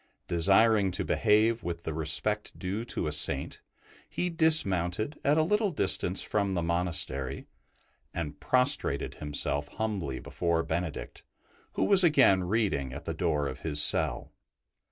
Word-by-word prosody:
Desiring 100 +4 +3
to 90 - -4
behave 110 +2 +1
with 85 -1 -6
the 80 - -4
respect 80 +7 +1
due 100 +4 -4
to 120 - -4
a 75 - -2
Saint, 70 -2 +1 0.5
he 180 0 -3
dismounted 110 - +1
at 145 +2 +2
a 160 - +3
little 210 +5 0
distance 95 - -1
from 100 -2 -2
the 85 - -2
monastery, 85 -6 -1 0.7
and 75 -3 -6
prostrated 125 - +1
himself 75 -1 -1
humbly 95 -9 -4
before 85 -1 -2
Benedict, 80 0 -5 0.5
who - - -1
was 195 -2 +4
again 130 - +3
reading 90 - -1
at - - -9
the - - -4
door 75 -1 -1
of 65 - -7
his 75 -2 -2
cell. - - +3
90 Hz, 140 wpm, -28 LUFS, 80-115 Hz, 0.7 s, was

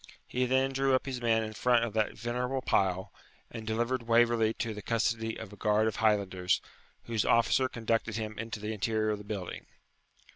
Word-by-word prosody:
He 125 0 0
then 130 +1 +2
drew 135 0 +3
up 130 - 0
his 130 -2 -4
men 115 -1 +2
in 110 0 -5
front 120 +1 +3
of 115 - -6
that 110 -1 0
venerable 125 +2 -2
pile, 95 -4 +1 0.4
and 110 -2 -7
delivered 120 +2 -1
Waverley 115 -1 +4
to 115 -2 -3
the 105 - -7
custody 115 0 0
of 100 - -8
a - - -9
guard 105 +2 +2
of 110 - -2
Highlanders, 100 -4 +2 0.4
whose 115 -2 -1
officer 125 +3 +3
conducted 115 -2 -1
him 110 -1 -4
into 115 -1 -4
the 105 +1 -3
interior 110 +1 0
of 105 - -2
the - - -9
building. 100 -3 -6
115 Hz, 190 wpm, -30 LUFS, 105-120 Hz, 0.4 s, Waverley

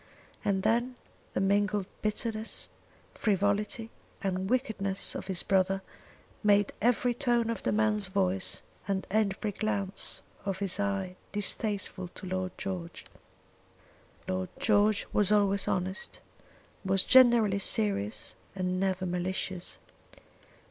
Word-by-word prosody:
And 190 -2 +1
then 240 +3 +1 0.4
the - - +2
mingled 205 +1 +2 0.2
bitterness, 215 - -1 0.4
frivolity, 205 +2 0 0.3
and 190 0 -1
wickedness 210 -7 0
of - - -6
his 190 -3 -1
brother, 195 0 +2 0.6
made 205 -1 +3
every 245 +2 +3
tone 240 -2 +1
of 230 - -4
the - - 0
man's 210 -2 +1
voice 190 0 0 0.2
and 195 -1 -1
every 210 0 +1
glance 200 -2 -1 0.2
of 195 -1 -2
his 195 -1 0
eye 195 -2 -1
distasteful 205 -2 0
to - - -7
Lord 185 0 -3
George. 180 -3 -5 1.2
Lord 95 0 -2
George 210 -1 +3
was 210 -1 +3
always 200 -1 +3
honest, 185 +2 -2 0.6
was 195 0 +3
generally 235 -6 +6
serious, 105 - 0 0.2
and 185 -1 -1
never 190 -1 0
malicious. 180 0 -3
200 Hz, 115 wpm, -30 LUFS, 185-215 Hz, 1.2 s, generally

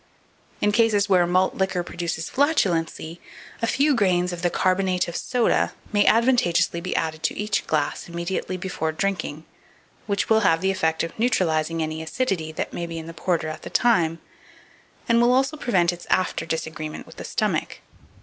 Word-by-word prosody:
In 210 - +3
cases 210 -2 +3
where 180 -3 +4
malt 185 +1 +2
liquor 190 -2 -1
produces 170 -2 -4
flatulency, 175 - 0 0.4
a 230 - +1
few 285 +5 +3
grains 180 -6 +2
of 170 - -6
the 175 - +2
"carbonate 185 0 +1
of 170 - -6
soda" 245 +3 +1 0.2
may 205 -1 +3
advantageously 225 -8 +3
be 185 - -3
added 160 -1 -1
to 160 - -1
each 210 -1 -1
glass 155 +2 -1
immediately 170 +2 -3
before 175 -3 -3
drinking, 165 -3 -3 0.6
which 200 -1 0
will 220 0 +4
have 165 -6 +3
the 190 0 +2
effect 160 -4 0
of 165 - -4
neutralizing 165 -8 +1
any 155 0 -4
acidity 165 -2 -2
that 155 - -4
may 170 - -4
be 165 0 -6
in 160 - -6
the 165 - -8
porter 170 -2 -1
at 155 - -6
the - - -8
time, 175 -9 +2 0.9
and 235 -1 +4
will 240 +1 +4
also 270 +4 +2
prevent 185 - +1
its 175 - -11
after 185 - 0
disagreement 160 -1 -4
with - - -15
the - - -6
stomach. - - -2
180 Hz, 175 wpm, -24 LUFS, 165-205 Hz, 0.9 s, where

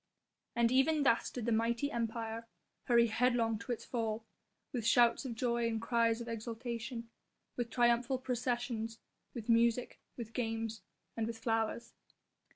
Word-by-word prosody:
And 235 0 +3
even 285 +4 +4
thus 235 -4 +3
did 245 -3 -5
the 235 - +1
mighty 235 +5 +1
Empire 230 -1 -3 0.4
hurry 235 -1 +5
headlong 230 -1 +2
to 230 +2 -5
its 235 - -3
fall; 225 -2 -2 0.5
with 240 -3 -2
shouts 235 +3 +4
of 240 -3 -4
joy 235 0 +1
and 225 -1 -1
cries 230 0 +2
of 235 - -6
exultation, 230 +1 -4 0.5
with 240 -1 -2
triumphal 240 +1 +3
processions, 240 -3 -2 0.4
with 230 -2 -6
music, 235 +1 +3 0.2
with 230 -2 -6
games 225 -1 -2 0.3
and 225 -1 -1
with 230 0 -4
flowers. 225 0 -1
235 Hz, 145 wpm, -34 LUFS, 225-245 Hz, 0.5 s, hurry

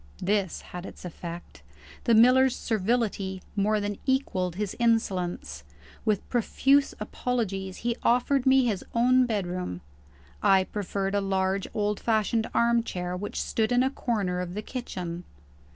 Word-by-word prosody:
This 195 -2 0
had 180 0 -8
its - - -11
effect. 170 0 -8 0.4
The 235 - +5
miller's 255 +3 +6
servility 210 -3 -1 0.2
more 210 +1 +2
than 205 -1 -3
equalled 185 -10 0
his 205 0 -3
insolence. 205 -7 0 0.4
With 210 -3 0
profuse 270 +4 +2
apologies, 205 -4 -2
he 240 -1 +1
offered 250 +2 +2
me 265 -1 +5
his 210 -6 -1
own 250 +2 +4
bedroom. 180 - -3 0.6
I 195 -2 +5
preferred 195 0 -3
a 205 - +2
large 190 0 0
old 210 -1 0
fashioned 220 0 +1
armchair 230 -7 +1
which 205 +3 -4
stood 220 +1 0
in 245 +1 +4
a 265 - +1
corner 200 -9 -1
of 180 0 -5
the 210 - -4
kitchen. 180 -9 -5
210 Hz, 135 wpm, -27 LUFS, 190-235 Hz, 0.6 s, miller's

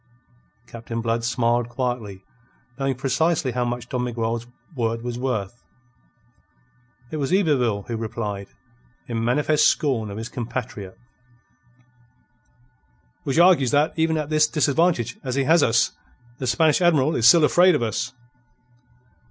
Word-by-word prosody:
Captain 115 -1 -7
Blood 115 0 -1
smiled 120 0 0
quietly, 120 -7 -4 0.6
knowing 135 -1 0
precisely 140 +3 0
how 125 0 -1
much 120 0 -4
Don 125 0 -2
Miguel's 115 -1 -3 0.3
word 115 -2 -2
was 120 0 -4
worth. 120 -4 -3 1.5
It 155 - -4
was 140 0 -2
Yberville 130 - +1
who 115 - -3
replied, 105 -3 -5 0.6
in 115 -2 -3
manifest 150 +5 +2
scorn 130 -9 0
of 100 - -7
his 110 +1 -5
compatriot: 115 -6 -6 2.3
"Which 135 - -1
argues 170 -7 +5
that, 145 +3 +2
even 160 0 +1
at 150 0 -4
this 155 0 +4
disadvantage 150 -5 0
as 130 -1 -3
he 140 - +1
has 165 +4 +4
us, 115 -3 +2 0.5
the 130 - -3
Spanish 155 +7 +2
Admiral 155 -4 +3
is 115 - +4
still 160 +6 +7
afraid 175 +3 +5
of 120 - -1
us." 115 +3 -2
125 Hz, 135 wpm, -23 LUFS, 115-150 Hz, 2.3 s, still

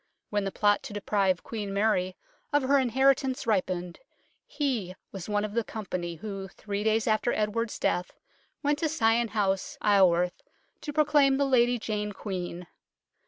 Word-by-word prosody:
When 205 -1 0
the 195 - -2
plot 205 0 +2
to 275 -6 -8
deprive 195 -3 0
Queen 210 -3 -5
Mary 195 -3 +1 0.4
of 290 -2 +3
her 275 +2 +4
inheritance 265 +1 +2
ripened 180 -5 -1 0.5
he 255 - -2 0.2
was 195 0 -7
one 205 0 +1
of 210 - -6
the 235 0 +1
company 180 -6 -5
who, 195 +1 -6
three 205 +1 -5
days 220 0 +2
after 220 +2 +2
Edward's 220 +2 -1
death, 180 0 0 0.5
went 290 0 +1
to 320 - 0
Sion 235 -6 +2
House, 210 +6 -1
Isleworth, 180 -5 +3 0.4
to 295 - -5
proclaim 290 -2 +4
the 280 - +2
Lady 245 -2 +3
Jane 210 -2 -3
Queen. 180 -3 -5
215 Hz, 155 wpm, -28 LUFS, 195-255 Hz, 0.5 s, her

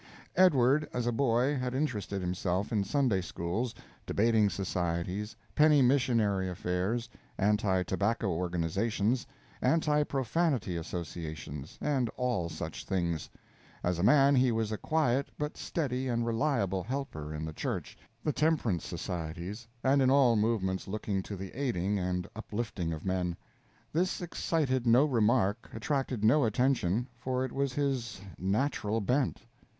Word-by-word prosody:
Edward, 150 -5 +4
as 125 -1 -1
a 120 - +2
boy, 125 +3 +2
had 125 -1 -2
interested 105 -9 -2
himself 90 +3 -1
in 105 -3 +2
Sunday 125 -5 +1
schools, 90 +8 -3 0.3
debating 110 -1 +3
societies, 90 +2 -2 0.2
penny 150 -2 +5
missionary 115 -7 +2
affairs, 90 +6 -1 0.3
anti 100 -2 +2
tobacco 100 +4 0
organizations, 95 +7 0 0.3
anti 150 +2 +3
profanity 135 - 0
associations, 80 -3 -6
and 135 -5 0
all 120 -10 0
such 80 0 -6
things; 85 -5 -1 0.5
as 90 -1 0
a - - 0
man, 140 +5 +6
he 130 -1 +4
was 110 -1 -1
a 110 - -1
quiet 140 -4 +1
but 150 0 -3
steady 130 -5 -2
and 120 -1 0
reliable 115 -6 +1
helper 95 - -4
in 75 0 -4
the 80 - -5
church, - - -4 0.3
the 150 - 0
temperance 145 - +1
societies, 90 +7 -5 0.2
and 135 +1 +4
in 130 - +4
all 135 -4 +5
movements 105 -4 0
looking 100 -1 -2
to 100 - -6
the 95 0 -7
aiding 105 -7 0
and 90 -1 -1
uplifting 105 -6 -3
of 80 +2 -5
men. 90 -2 -1 0.6
This 180 +4 +1
excited 145 -7 0
no 120 +5 +6
remark, 115 -4 +2
attracted 130 -1 -1
no 140 +7 +5
attention 120 -2 +1
for 130 +1 -1
it 130 - -6
was 140 -1 -1
his 130 -7 -1 0.2
"natural 105 +2 0
bent." 125 +5 0
115 Hz, 135 wpm, -31 LUFS, 95-130 Hz, 0.6 s, man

